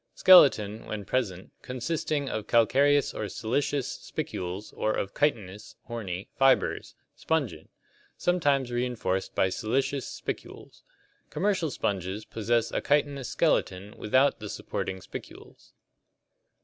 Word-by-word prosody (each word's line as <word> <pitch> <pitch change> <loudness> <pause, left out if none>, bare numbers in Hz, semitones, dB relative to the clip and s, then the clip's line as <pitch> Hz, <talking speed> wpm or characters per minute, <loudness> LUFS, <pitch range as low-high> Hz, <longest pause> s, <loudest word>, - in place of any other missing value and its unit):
Skeleton, 115 - +6
when 105 -2 -5
present, 95 -7 -2
consisting 145 +3 -2
of 110 -4 -4
calcareous 140 +5 +3
or 105 - -4
siliceous 130 +3 -1
spicules 90 +3 -5
or 110 - 0
of 100 - -3
chitinous 105 -9 -1
(horny) 100 -5 -5
fibers 135 -1 +2 0.2
(spongin), 140 - -2 0.5
sometimes 145 -8 +1
reinforced 120 -6 -2
by 95 - +3
siliceous 130 +7 -1
spicules. - - -7 0.5
Commercial 185 -5 0
sponges 100 -3 -3
possess 115 +1 0
a - - -1
chitinous 140 -2 0
skeleton 95 +3 0
without 130 +6 +2
the - - -7
supporting 95 -1 -4
spicules. - - -11
120 Hz, 110 wpm, -28 LUFS, 100-140 Hz, 0.5 s, Skeleton